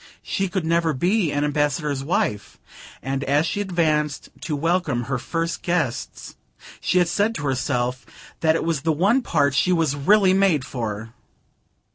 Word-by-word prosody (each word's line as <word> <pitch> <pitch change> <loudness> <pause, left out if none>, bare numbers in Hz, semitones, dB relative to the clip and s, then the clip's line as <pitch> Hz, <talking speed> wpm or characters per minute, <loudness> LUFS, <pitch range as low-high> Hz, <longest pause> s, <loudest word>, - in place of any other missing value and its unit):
She 195 - -1
could 180 -2 -2
never 165 -1 +2
be 175 +4 +1
an 145 0 0
Ambassador's 145 -1 -1
wife; 105 - -1 0.5
and 135 +2 -2
as 145 +3 +2
she 205 - -2
advanced 155 -6 0
to 155 - -3
welcome 160 -5 0
her 135 +1 -2
first 165 +5 -3
guests 170 -9 -2 0.4
she 180 -1 +2
said 205 +6 0
to - - -5
herself 125 -2 -1 0.4
that 160 -1 +3
it - - -1
was 165 -3 -1
the 160 - +1
one 200 - +2
part 145 - +1
she 180 +6 +2
was 165 -5 +1
really 190 +6 +4
made 190 -8 +2
for. 115 -4 -5
155 Hz, 155 wpm, -23 LUFS, 140-175 Hz, 0.5 s, really